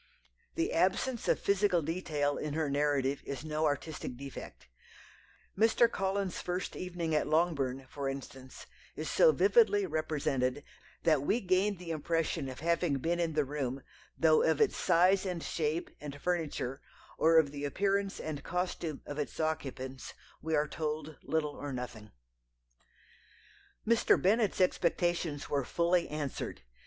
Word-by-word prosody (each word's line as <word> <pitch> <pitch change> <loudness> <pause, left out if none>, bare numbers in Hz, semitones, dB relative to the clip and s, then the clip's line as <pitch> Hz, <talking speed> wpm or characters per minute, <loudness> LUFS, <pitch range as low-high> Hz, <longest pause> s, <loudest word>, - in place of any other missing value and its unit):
The 165 - 0
absence 195 +8 +1
of - - +3
physical 200 -4 +2
detail 150 -3 -1
in 150 -1 -3
her 155 -3 0
narrative 140 -1 +1
is 140 +2 -6
no 155 0 0
artistic 145 -3 -3
defect. 135 - -9 0.9
Mr. 225 +3 +5
Collins's 195 -3 -2
first 180 +1 -3
evening 175 -3 -3
at 150 - +2
Longbourn, 145 -5 +1
for 140 0 -3
instance, 135 -1 -8 0.3
is - - -4
so - - +6
vividly 425 -4 +4
represented 145 - -1 0.4
that 155 -4 +4
we 205 - +1
gain 190 0 +1
the 170 -1 -6
impression 160 -2 -1
of 130 +2 -8
having 170 -3 +1
been 170 +6 -1
in 165 -2 0
the 150 -1 +1
room, 135 -2 -3 0.3
though 160 -1 +5
of 160 -2 +2
its - - +3
size 185 +3 +4
and 180 -4 -3
shape, 155 +1 -2
and 145 -1 -7
furniture, 155 -6 -2 0.4
or 165 +1 +5
of 150 -3 +4
the 145 0 -6
appearance 195 +6 0
and 150 -2 -5
costume 175 -3 -3
of 145 +1 -6
its 150 - -4
occupants, 135 -4 -3 0.3
we 160 +1 0
are 150 0 +2
told 155 0 -4
little 155 -2 -1
or 145 0 -6
nothing 120 -4 -6 1.8
"Mr. 230 0 +4
Bennet's 210 +2 +2
expectations 175 -4 +1
were 140 -1 0
fully 170 +5 +1
answered. 150 - -4
155 Hz, 145 wpm, -32 LUFS, 145-180 Hz, 1.8 s, so